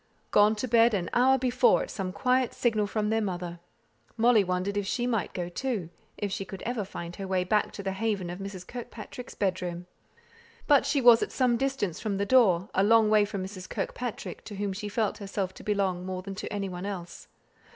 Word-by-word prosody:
Gone 210 Hz, +1 st, +5 dB
to 235 Hz, +4 st, -3 dB
bed 230 Hz, -1 st, +5 dB
an 175 Hz, -3 st, -2 dB
hour 260 Hz, +2 st, +5 dB
before, 255 Hz, 0 st, +3 dB
at -, -, -7 dB
some 190 Hz, -2 st, -3 dB
quiet 255 Hz, +4 st, +1 dB
signal 215 Hz, -4 st, +1 dB
from 210 Hz, 0 st, -1 dB
their 225 Hz, 0 st, +2 dB
mother. 175 Hz, -4 st, -4 dB, 0.6 s
Molly 230 Hz, -2 st, +5 dB
wondered 185 Hz, +2 st, -1 dB
if 205 Hz, -1 st, -1 dB
she 240 Hz, +3 st, -1 dB
might 225 Hz, -6 st, -1 dB
go, 175 Hz, -2 st, -4 dB
too 190 Hz, -3 st, -3 dB, 0.3 s
if 205 Hz, -1 st, -3 dB
she 195 Hz, -, -2 dB
could 195 Hz, 0 st, -9 dB
ever 235 Hz, -2 st, -2 dB
find 175 Hz, -3 st, -7 dB
her 195 Hz, -, -5 dB
way 185 Hz, -1 st, +1 dB
back 210 Hz, +3 st, +1 dB
to 200 Hz, -, -7 dB
the 195 Hz, -, -1 dB
haven 195 Hz, -3 st, -2 dB
of 180 Hz, -, -7 dB
Mrs. 195 Hz, -2 st, -7 dB
Kirkpatrick's 240 Hz, +1 st, -8 dB
bedroom. 180 Hz, -3 st, -2 dB, 0.8 s
But 285 Hz, -2 st, +4 dB
she 280 Hz, -, +2 dB
was 240 Hz, -2 st, +7 dB
at -, -, -2 dB
some 250 Hz, -2 st, +2 dB
distance 265 Hz, -9 st, -1 dB
from 210 Hz, -3 st, -2 dB
the 200 Hz, -, 0 dB
door; 200 Hz, -7 st, +4 dB
a 190 Hz, -, +3 dB
long 220 Hz, 0 st, +5 dB
way 210 Hz, -1 st, +5 dB
from 200 Hz, -2 st, -4 dB
Mrs. 190 Hz, -1 st, -9 dB
Kirkpatrick, 245 Hz, -3 st, -4 dB
to 210 Hz, -, -7 dB
whom 200 Hz, 0 st, -2 dB
she 205 Hz, +2 st, -5 dB
felt 215 Hz, +1 st, -1 dB
herself 195 Hz, -2 st, -3 dB
to -, -, -12 dB
belong 195 Hz, -4 st, 0 dB
more 185 Hz, 0 st, -4 dB
than 195 Hz, 0 st, -6 dB
to 190 Hz, -, -6 dB
any 200 Hz, -1 st, -2 dB
one 180 Hz, +1 st, -5 dB
else. 180 Hz, -4 st, -7 dB
205 Hz, 215 wpm, -28 LUFS, 185-230 Hz, 0.8 s, was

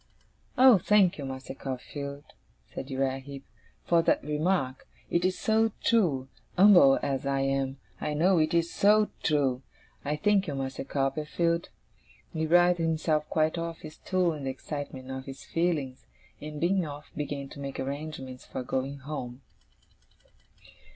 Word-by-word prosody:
'Oh, 255 Hz, -5 st, +8 dB
thank 195 Hz, -2 st, +3 dB
you, 140 Hz, -, -4 dB
Master 130 Hz, 0 st, -6 dB
Copperfield,' 140 Hz, +2 st, -7 dB, 0.4 s
said 135 Hz, -, -6 dB
Uriah 135 Hz, 0 st, -1 dB
Heep, 140 Hz, 0 st, -10 dB, 0.4 s
'for 170 Hz, -1 st, +4 dB
that -, -, +2 dB
remark! 150 Hz, -3 st, -1 dB, 0.2 s
It 170 Hz, -, +2 dB
is 185 Hz, 0 st, +1 dB
so 220 Hz, +1 st, +2 dB
true! 160 Hz, -, +2 dB, 0.3 s
Umble 180 Hz, -8 st, +7 dB
as 135 Hz, 0 st, -1 dB
I 135 Hz, 0 st, +1 dB
am, 135 Hz, 0 st, 0 dB, 0.2 s
I 150 Hz, 0 st, -2 dB
know 175 Hz, +3 st, +4 dB
it 155 Hz, 0 st, +2 dB
is 170 Hz, 0 st, +1 dB
so 210 Hz, +1 st, +4 dB
true! 135 Hz, -4 st, +1 dB, 0.4 s
Oh, 150 Hz, +1 st, -1 dB
thank 205 Hz, -2 st, +3 dB
you, 145 Hz, -, -3 dB
Master 135 Hz, -1 st, -4 dB
Copperfield!' 150 Hz, +5 st, -1 dB, 0.6 s
He 160 Hz, 0 st, -1 dB
writhed 175 Hz, +1 st, +5 dB
himself 155 Hz, -2 st, 0 dB
quite 160 Hz, +1 st, +1 dB
off 165 Hz, 0 st, -5 dB
his 155 Hz, -1 st, -9 dB
stool 180 Hz, -1 st, 0 dB
in 145 Hz, -3 st, -6 dB
the -, -, -1 dB
excitement 130 Hz, -1 st, -6 dB
of 130 Hz, 0 st, -6 dB
his 135 Hz, 0 st, -9 dB
feelings, 155 Hz, -7 st, -2 dB, 0.3 s
and, 150 Hz, 0 st, -6 dB
being 185 Hz, +3 st, +2 dB
off, 150 Hz, -1 st, -8 dB
began 145 Hz, -2 st, -4 dB
to -, -, -11 dB
make 140 Hz, -1 st, -5 dB
arrangements 135 Hz, -2 st, -5 dB
for 130 Hz, -, -6 dB
going 130 Hz, +3 st, -2 dB
home. 130 Hz, -2 st, -6 dB
150 Hz, 150 wpm, -28 LUFS, 135-170 Hz, 0.6 s, Oh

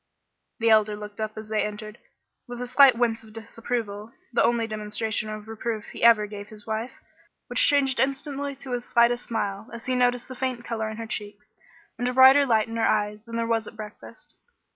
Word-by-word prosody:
The 230 Hz, -1 st, +2 dB
Elder 215 Hz, -1 st, +4 dB
looked 210 Hz, +1 st, -8 dB
up 215 Hz, 0 st, -4 dB
as 215 Hz, 0 st, -8 dB
they 215 Hz, -1 st, +1 dB
entered, 210 Hz, +1 st, -6 dB, 0.5 s
with 245 Hz, 0 st, -7 dB
a 250 Hz, -, -3 dB
slight 255 Hz, 0 st, +6 dB
wince 230 Hz, -2 st, +1 dB
of 215 Hz, -1 st, -15 dB
disapproval, 225 Hz, -1 st, -5 dB, 0.2 s
the -, -, +3 dB
only 235 Hz, -1 st, +2 dB
demonstration 215 Hz, 0 st, -2 dB
of 215 Hz, 0 st, -7 dB
reproof 225 Hz, 0 st, -4 dB
he -, -, -9 dB
ever 230 Hz, -2 st, +6 dB
gave 205 Hz, -1 st, -8 dB
his 210 Hz, -1 st, -11 dB
wife, 225 Hz, +3 st, -3 dB, 0.5 s
which 245 Hz, -, +4 dB
changed 275 Hz, -3 st, +3 dB
instantly 280 Hz, +1 st, -2 dB
to 260 Hz, -2 st, -5 dB
as 240 Hz, -1 st, -2 dB
slight 235 Hz, -1 st, +4 dB
a 240 Hz, -, 0 dB
smile, 220 Hz, -2 st, -4 dB
as 235 Hz, -1 st, -9 dB
he 255 Hz, -, -1 dB
noticed 245 Hz, -1 st, +1 dB
the 255 Hz, -, -7 dB
faint 255 Hz, -2 st, -3 dB
color 220 Hz, -2 st, -3 dB
in 220 Hz, -, -7 dB
her 230 Hz, -, -5 dB
cheek, 205 Hz, -2 st, -5 dB, 0.6 s
and 245 Hz, -, 0 dB
a -, -, -3 dB
brighter 265 Hz, +2 st, +7 dB
light 220 Hz, -2 st, +3 dB
in 230 Hz, 0 st, -5 dB
her 225 Hz, -, +2 dB
eyes 210 Hz, 0 st, 0 dB
than 230 Hz, 0 st, -8 dB
there 230 Hz, 0 st, 0 dB
was 225 Hz, -1 st, 0 dB
at -, -, -11 dB
breakfast. 210 Hz, -1 st, -11 dB
225 Hz, 210 wpm, -25 LUFS, 215-245 Hz, 0.6 s, brighter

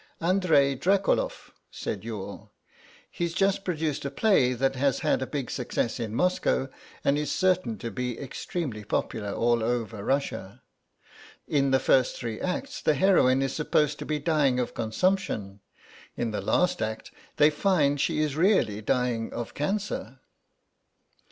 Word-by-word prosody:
"Andrei 165 Hz, -6 st, +3 dB
Drakoloff," 195 Hz, -, 0 dB, 0.2 s
said -, -, -5 dB
Youghal; -, -, -7 dB, 0.6 s
"he's 170 Hz, -1 st, -3 dB
just 195 Hz, +1 st, +2 dB
produced 155 Hz, -5 st, -2 dB
a 140 Hz, -, -2 dB
play 140 Hz, -, +3 dB
that 135 Hz, +2 st, 0 dB
has 135 Hz, 0 st, +1 dB
had -, -, +1 dB
a 130 Hz, -, -2 dB
big 140 Hz, -4 st, -4 dB
success 125 Hz, -1 st, -2 dB
in 110 Hz, -2 st, -3 dB
Moscow 180 Hz, -5 st, +1 dB, 0.3 s
and 140 Hz, +1 st, +2 dB
is 150 Hz, -1 st, -2 dB
certain 185 Hz, -, +1 dB
to 115 Hz, +4 st, -5 dB
be 125 Hz, -2 st, -3 dB
extremely 135 Hz, -4 st, -4 dB
popular 105 Hz, 0 st, -2 dB
all 120 Hz, +1 st, +1 dB
over 115 Hz, -3 st, -2 dB
Russia. 135 Hz, -7 st, -2 dB, 0.8 s
In 140 Hz, -2 st, +2 dB
the 130 Hz, -, +4 dB
first 130 Hz, -1 st, +3 dB
three 115 Hz, -3 st, -5 dB
acts 275 Hz, +11 st, -3 dB
the 155 Hz, -, +2 dB
heroine 135 Hz, -6 st, +4 dB
is 135 Hz, -, -1 dB
supposed 150 Hz, -1 st, +1 dB
to -, -, -5 dB
be 155 Hz, -, 0 dB
dying 145 Hz, -4 st, +2 dB
of 125 Hz, -, -2 dB
consumption; 110 Hz, -, -1 dB, 0.6 s
in 115 Hz, -2 st, -1 dB
the 105 Hz, -, -3 dB
last 180 Hz, 0 st, +1 dB
act 110 Hz, 0 st, -4 dB, 0.3 s
they 150 Hz, +1 st, +6 dB
find 150 Hz, -4 st, +2 dB
she -, -, +1 dB
is 150 Hz, -2 st, -1 dB
really 160 Hz, -, +2 dB
dying 120 Hz, 0 st, 0 dB
of 120 Hz, -1 st, -5 dB
cancer." 150 Hz, -, -3 dB
140 Hz, 150 wpm, -27 LUFS, 120-170 Hz, 0.8 s, they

